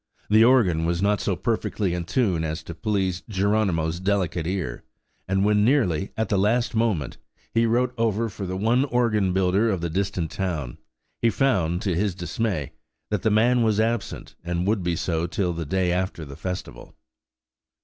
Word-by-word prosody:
The 110 +1 +7
organ 105 -10 +4
was 85 0 0
not 105 0 +2
so 100 - 0
perfectly 105 -3 -1
in 90 -1 -3
tune 95 -6 +1
as 80 +1 -3
to 85 - -7
please 95 -2 -1
Geronimo's 95 -5 +1
delicate 90 -4 0
ear; 90 -10 -3 0.4
and 95 +1 +1
when, 105 0 +3
nearly 105 - +2
at 110 - 0
the 100 - +2
last 115 +5 +1
moment, 110 - 0 0.4
he 115 0 +3
wrote 125 +2 +1
over 115 0 +1
for 100 -2 -6
the 95 +1 -3
one 115 +6 +2
organ 115 -7 +1
builder 95 +4 +2
of 95 -4 0
the 85 -1 -2
distant 95 -2 -2
town, 80 -10 -3 0.4
he 115 - +4
found, 95 - +1
to 95 - 0
his 95 +2 0
dismay, 90 -3 -2 0.4
that 105 -3 0
the 110 - +2
man 120 +4 +3
was 110 -2 +2
absent, 115 -1 -2
and 85 +1 -2
would 105 0 +1
be 85 -1 -1
so 85 0 -1
till 90 0 -1
the 85 -1 -4
day 95 +1 +1
after 90 -3 -2
the 70 -1 -9
festival. 90 +3 -6
95 Hz, 180 wpm, -24 LUFS, 85-110 Hz, 0.4 s, The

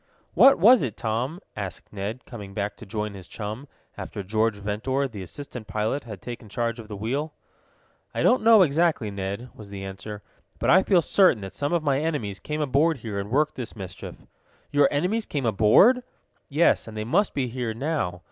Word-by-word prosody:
"What 270 - +7
was 230 +8 +7
it, 120 -7 -3
Tom?" 120 +9 -2 0.2
asked 100 -1 -7
Ned, 105 +5 -5
coming 100 -5 -9
back 100 0 -2
to 110 - -12
join 105 0 -3
his 95 -3 -10
chum, 110 +6 -6 0.3
after 100 - -6
George 110 +3 +1
Ventor, 110 +7 -1
the 110 -6 -8
assistant 110 - -8
pilot, 110 +7 -2
had 105 -6 -9
taken 120 -3 -8
charge 115 +2 -2
of 110 - -9
the 105 - -7
wheel. 135 +9 -2 0.8
"I - - -2
don't 250 - +4 0.2
exactly 155 - +1
know, 100 -1 -6
Ned," 100 +6 -4
was 105 -2 -12
the 100 -1 -7
answer. 100 +2 -7 0.3
"But - - +2
I 190 - +7
feel 185 -3 +3
certain 185 - +4
that 95 -1 -7
some 145 +1 -2
of 170 -2 +1
my 140 -2 +2
enemies 145 - -2
came 150 0 -4
aboard 150 +3 +2
here 100 -3 -3
and 100 +1 -5
worked 150 +5 +2
this 120 -3 -7
mischief." 95 -4 -8 0.6
"Your 145 -1 +5
enemies 190 +10 0
came 140 -4 -2
aboard?" 115 - +5 0.5
"Yes, 155 -2 +3
and 110 -1 -8
they 110 - -2
must 185 - +1
be 135 - +1
here 120 -2 -3
now. 130 - -2
115 Hz, 195 wpm, -25 LUFS, 105-145 Hz, 0.8 s, What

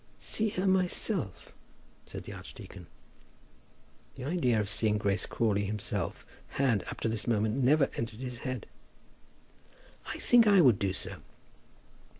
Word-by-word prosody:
"See 220 0 0
her 190 -1 -2
myself?" 185 - 0 0.5
said - - -7
the - - -8
archdeacon. - - -10 1.3
The 130 - -8
idea 130 -7 +1
of 105 - -1
seeing 105 +1 +2
Grace 100 -1 0
Crawley 100 -3 +1
himself 105 +1 -3 0.3
had, 125 -7 +2
up - - -7
to - - +1
this 110 -2 -2
moment, 110 +3 +1
never 140 +2 +5
entered 115 -1 -4
his 125 -2 -5
head. 130 -3 -4 1.4
"I - - -4
think 240 -2 +5
I 200 -2 +6
would 125 - +6
do 100 -1 +1
so." - - -5
120 Hz, 140 wpm, -30 LUFS, 105-155 Hz, 1.4 s, I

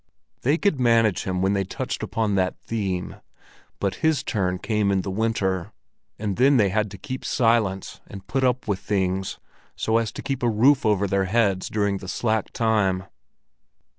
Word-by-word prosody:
They 145 +6 +2
could 175 -7 +1
manage 115 -5 +3
him 95 -1 -1
when 95 +1 +2
they 100 -1 +1
touched 95 - -4
upon 110 -2 -1
that 95 -1 0
theme, 95 -5 -3 0.6
but 100 -2 -1
his 160 -2 +2
turn 90 -5 -1
came 105 0 0
in 95 -1 +2
the 95 - -4
winter, 95 -4 -1 0.4
and 100 -3 -3
then 135 +3 +5
they 105 -4 +4
had 105 +2 0
to 100 - -10
keep 130 +7 -6
silence 115 -5 +1
and 100 -1 -10
put 135 +1 -1
up 125 -1 +1
with 100 -3 0
things, 95 -1 -1 0.4
so 110 +1 +1
as 115 -2 -2
to - - -7
keep 135 -2 -3
a 120 - +2
roof 125 +4 +4
over 100 -2 +2
their 100 -1 +1
heads 100 -2 +1
during 100 -2 0
the 95 - -9
slack 110 +2 -1
time. 105 -5 +1
105 Hz, 180 wpm, -24 LUFS, 95-115 Hz, 0.6 s, then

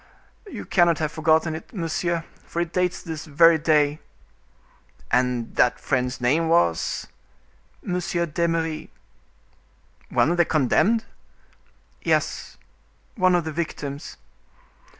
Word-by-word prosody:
"You - - -7
cannot 175 -3 +3
have 155 -1 -2
forgotten 160 0 +2
it, 160 +7 -9
monsieur, 170 -1 -1 0.2
for 170 - -5
it 170 -1 -2
dates 180 -1 0
this 160 -2 -6
very 160 +2 +5
day." 150 -1 +2 1.1
"And 125 -1 0
that 125 - +3
friend's 125 -1 -1
name 150 +7 +1
was—" 85 - +1 0.8
"M. 180 - -2
d'Eymeris." 170 -2 -1 1.2
"One 160 - +2
of 175 - 0
the 175 - +4
condemned?" 190 - +2 1.0
"Yes, - - -1 0.6
one 185 -3 +3
of 175 - +1
the 160 - -4
victims. 150 -2 -5
160 Hz, 110 wpm, -24 LUFS, 145-170 Hz, 1.2 s, very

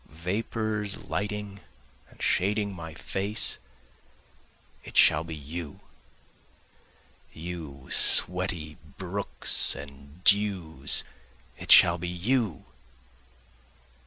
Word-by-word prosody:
Vapors 105 +4 -3
lighting 105 -1 -5 0.5
and - - -21
shading 100 +1 0
my 80 -3 -9
face 100 +5 -2 1.2
it - - -8
shall 75 - +5
be 80 -1 -7
you! 75 +1 -8 1.5
You 80 -5 -8
sweaty 90 -4 +3 0.2
brooks 95 +2 0
and 70 +4 -13
dews 95 - +3 0.5
it - - -5
shall 85 0 +7
be 90 - -5
you! 100 - -1
90 Hz, 80 wpm, -27 LUFS, 80-100 Hz, 1.5 s, shall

